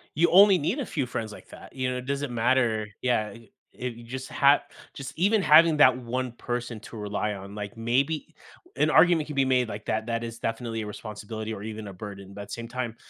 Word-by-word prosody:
You 170 +3 +3
only 195 +1 +7
need 160 - -1
a 270 - -2
few 140 -5 -2
friends 110 -3 -4
like - - -13
that, - - -13
you 130 -1 -1
know, 125 - -2
it 125 - -8
doesn't 140 -1 -2
matter, 115 -2 +1
yeah, 115 -4 +1
eh, 115 0 -14 0.3
eh, 125 - -2
you 120 -1 -10
just 130 +3 -6
have 140 +1 +4 0.3
just 135 -2 -7
even 200 +3 +3
having 155 0 +6
that 130 -3 +7
1 125 +1 -3
person 120 -1 -4
to 115 - -11
rely 105 0 -2
on, 100 +1 -9
like, 105 +3 -6
maybe 130 +7 0 0.4
an 155 - +2
argument 160 0 +5
can 150 - -6
be 135 - +4
made 130 -2 +2
like 105 0 -7
that, 110 +1 -1
that 115 0 -2
is 115 0 -6
definitely 115 -1 -3
a - - -5
responsibility 110 +1 -6
or 100 -2 -6
even 110 -1 -6
a 100 - -8
burden, 100 0 -9
but 100 - -7
at - - -11
the - - -9
same 115 0 -6
time, 120 -2 -4
120 Hz, 235 wpm, -27 LUFS, 110-140 Hz, 0.4 s, only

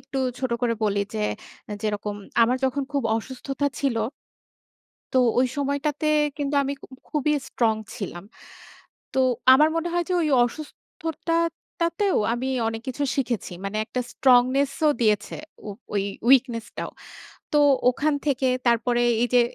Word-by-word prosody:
একটু 270 0 -5 0.2
ছোট 260 -2 -2
করে 235 -1 +2
বলি 200 -1 +1
যে, 105 - 0 0.6
যেরকম 210 -1 -2 0.3
আমার 245 +2 +3
যখন 265 +2 0
খুব 280 -1 0
অসুস্থতা 265 +5 -3
ছিল। 270 -5 0 1.2
তো 260 - +5 0.2
ওই 255 - +3
সময়টাতে 285 +2 -1 0.3
কিন্তু 285 -1 -1
আমি 275 +1 -2
খু - - -10 0.2
খুবই 300 0 +1 0.2
স্ট্রং 225 -2 +1 0.2
ছিলাম। 180 -3 -6 0.9
তো 265 - +1 0.3
আমার 300 +4 +5
মনে 330 +1 -1
হয় 345 0 0
যে - - +1
ওই 310 - +1 0.2
অসুস্থতাটাতেও, 335 - -2 0.2
আমি 255 +2 -2 0.2
অনেক 225 0 -3
কিছু 270 +3 -3
শিখেছি। 240 -8 -2
মানে 195 +2 -3
একটা 250 +3 -3
স্ট্রংনেস 260 +3 +4 0.2
ও - - +6
দিয়েছে। 210 -2 +1 0.3
ও - - -4 0.3
ওই 200 - +1 0.3
উইকনেস 245 -4 +4
টাও। - - -4 0.6
তো 300 - +4 0.3
ওখান 290 +4 0
থেকে 270 -2 +1 0.2
তারপরে 240 +1 +2 0.2
এই 245 - +2
যে 245 - +7
260 Hz, 140 wpm, -24 LUFS, 235-290 Hz, 1.2 s, যে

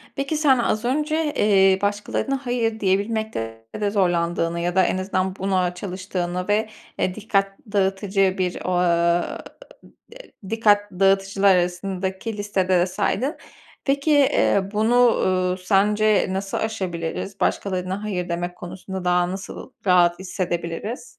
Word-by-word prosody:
Peki, 275 +3 -2
sen, 280 -4 +4
az 225 0 0
önce, 300 +3 0
eee, 195 -2 +4
başkalarına 210 +6 -2
hayır 230 -2 -1
diyebilmekte 195 - -2 0.2
de 205 - +1
zorlandığını 170 -3 0
ya 175 +1 -2
da 190 - +5
en - - 0
azından 185 0 -1
buna 185 -2 0
çalıştığını 180 -1 -4
ve, 215 +1 +1 0.3
eee, 185 - 0
dikkat 195 -2 -1
dağıtıcı 195 -1 +1
bir, 180 -1 -2
o - - -1
ııı, 170 -1 +1 1.1
dikkat 205 -2 +2
dağıtıcılar 195 +1 +3
arasındaki 190 +4 -2
listede 200 -2 -1
de 175 - +3
saydın. 255 - -1 0.5
Peki, 280 +2 +1
eee, 230 -8 +3
bunu, 220 +3 +2
uuu, 185 -7 +3
sence 210 +2 +2
nasıl 195 +1 -3
aşabiliriz? 190 -2 -4
Başkalarına 185 +1 -1
hayır 180 -4 -3
demek 175 +1 -3
konusunda 185 +1 -7
daha 180 0 +2
nasıl 195 +1 -8
rahat 175 -1 +4
hissedebiliriz? 180 - -4
195 Hz, 125 wpm, -22 LUFS, 180-215 Hz, 1.1 s, da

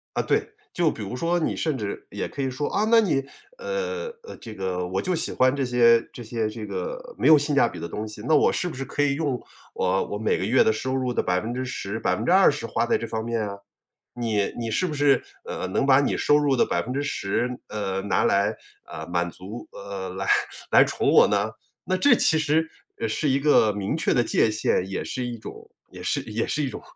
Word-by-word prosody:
啊， - - +2
对， - - 0 0.2
就 170 -3 +2
比 - - -8
如 105 +3 -5
说 170 +6 0
你 160 - -1
甚 155 -4 -1
至 105 -4 -5
也 - - -4
可 140 - -6
以 135 - 0
说， 130 +3 -3
啊， 210 - +1
那 230 0 +7
你 160 -11 +1 0.3
呃， 480 0 -3 0.2
呃， 465 - -9
这 110 -2 -10
个 90 -2 -2
我 95 +2 -1
就 185 - -1
喜 165 - -1
欢 130 +1 +3
这 140 - -1
些 120 -2 +5
这 120 - -9
些 115 -1 -2
这 110 0 -7
个 - - -6
没 - - +1
有 155 - +9
性 145 0 0
价 140 - +5
比 90 - -8
的 85 - -5
东 105 +6 -5
西， 105 -1 -9
那 155 - +4
我 - - +4
是 - - -1
不 175 - -5
是 135 - -4
可 145 +2 -1
以 140 -1 +2
用 140 -4 -1 0.4
我 95 +1 +1
我 105 - -4
每 110 +1 +1
个 - - -2
月 125 +6 +4
的 110 - +3
收 130 +4 -2
入 130 -2 -1
的 - - +1
10%， 110 +2 -2
20% 150 - +3
花 115 - 0
在 - - +2
这 115 - -5
方 110 0 -3
面 115 0 -1
啊？ 100 0 -6 0.6
你 110 -4 0
你 115 -1 -3
是 185 - +1
不 155 - -4
是， 145 -3 +3 0.2
呃， - - -4
能 95 - 0
把 135 0 +6
你 140 - 0
收 145 - +4
入 145 -2 +2
的 - - +3
10%， 125 -4 -1 0.2
呃， 95 -2 -3
拿 100 0 +1
来， 100 +2 +2 0.3
呃， - - -8
满 85 0 -1
足 100 +7 -9
呃， 100 -1 -6
来 95 +1 -5 0.4
来 - - +8
宠 - - 0
我 - - +7
呢？ 105 +1 0 0.3
那 185 - 0
这 250 +6 +5
其 160 - +3
实， 155 +1 +1 0.3
呃， - - -1
是 140 +7 0
一 135 +1 +2
个 140 -7 +4
明 100 +5 -2
确 160 - +1
的 120 - +3
界 115 - +2
限， 105 -3 0
也 95 - -3
是 125 - -3
一 120 -1 -5
种 110 - -11 0.2
也 - - -10
是 - - 0
也 110 +1 -2
是 150 - -1
一 135 - -1
种 - - -8
120 Hz, 240 characters per minute, -25 LUFS, 105-145 Hz, 0.6 s, 有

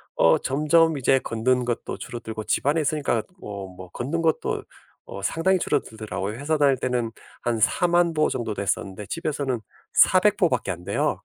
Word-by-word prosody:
어 - - +5
점점 155 +3 +3
이제 135 0 +3
걷는 125 +2 0
것도 120 -1 -3
줄어들고, 110 -3 -6
집 - - 0
안에 155 +3 +3
있으니까 145 -6 0 0.2
어 100 -2 -6
뭐 90 0 -11
걷는 145 +8 -2
것도 160 -1 0 0.4
어 100 - -8
상당히 185 - +2
줄어들더라고요. 110 - -2
회사 155 +3 0
다닐 140 -2 +4
때는 125 -2 -1 0.3
한 120 -2 -1
40,000 175 - +3
보 155 -1 +2
정도 120 -4 -2
됐었는데, 100 0 -3
집에서는 140 -6 -2 0.3
400 - - +5
보밖에 - - +1
안 85 - -7
돼요. - - 0
130 Hz, 325 characters per minute, -24 LUFS, 110-155 Hz, 0.4 s, 어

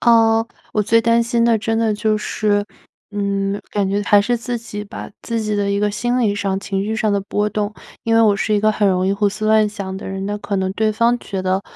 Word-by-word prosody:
呃， 225 -1 +4 0.3
我 210 - +1
最 230 +3 +3
担 230 +1 +3
心 235 0 +1
的 230 -2 +3
真 225 +1 -1
的 225 -2 +2
就 215 0 +1
是 210 -1 0 0.5
嗯， 200 0 -1
感 200 -2 0
觉 200 +1 0
还 205 0 +5
是 240 +4 0
自 235 +1 -4
己 210 -2 -7
吧。 200 - -8
自 230 -1 -2
己 210 -1 -1
的 200 0 0
一 200 - 0
个 210 0 +1
心 240 +4 -1
理 205 -3 +2
上 195 -2 -1
情 195 0 -2
绪 220 +1 -2
上 215 -1 0
的 200 - +2
波 205 +1 -1
动， 210 0 -2 0.3
因 225 -2 +1
为 225 - +5
我 210 -3 +4
是 215 - -1
一 205 - +2
个 215 0 +3
很 210 -1 +1
容 185 -1 +2
易 195 - +2
胡 205 0 +1
思 215 +1 -4
乱 215 0 +4
想 200 -2 -5
的 - - -7
人， 195 0 -4
那 205 0 -2
可 205 -1 -3
能 190 0 0
对 215 -1 +1
方 235 +2 +2
觉 195 -4 -5
得， 185 +1 0
210 Hz, 275 characters per minute, -19 LUFS, 200-225 Hz, 0.5 s, 还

